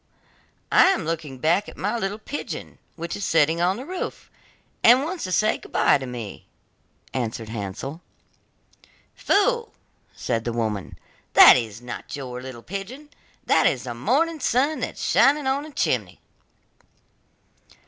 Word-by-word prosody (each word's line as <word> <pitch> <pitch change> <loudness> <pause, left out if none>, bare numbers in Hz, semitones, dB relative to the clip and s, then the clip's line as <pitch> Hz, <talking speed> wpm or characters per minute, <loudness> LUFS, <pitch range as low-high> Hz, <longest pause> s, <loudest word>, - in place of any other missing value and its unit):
'I - - +7
am 375 - +2
looking 155 -4 -4
back 170 +9 +1
at - - -14
my 205 +4 -1
little 205 -2 -2
pigeon 270 +6 -7 0.2
which 170 0 -5
is 205 - -5
sitting 165 0 +2
on 185 +3 +2
the 255 - -7
roof, 365 +3 -6 0.5
and 245 +4 +7
wants 340 +3 -4
to 185 - -5
say 215 +4 +2
goodbye - - +2
to 130 - -6
me,' 120 -5 -8 0.7
answered 115 -3 -3
Hansel. 115 - -6 1.1
'Fool!' 460 +3 +1 0.4
said 115 -2 -2
the 120 - -3
woman, 110 -4 -3 0.4
'that - - +10
is 115 -2 -3
not 125 +4 -7
your 125 -3 -6
little 130 -3 -9
pigeon, 215 - -7 0.4
that - - +4
is 130 - 0
the 125 -2 -5
morning 290 - 0
sun 275 +4 +1
that - - -4
is - - -5
shining 290 +1 +4
on 265 +1 +1
the 305 +1 -10
chimney. - - -1
170 Hz, 150 wpm, -24 LUFS, -, 1.1 s, that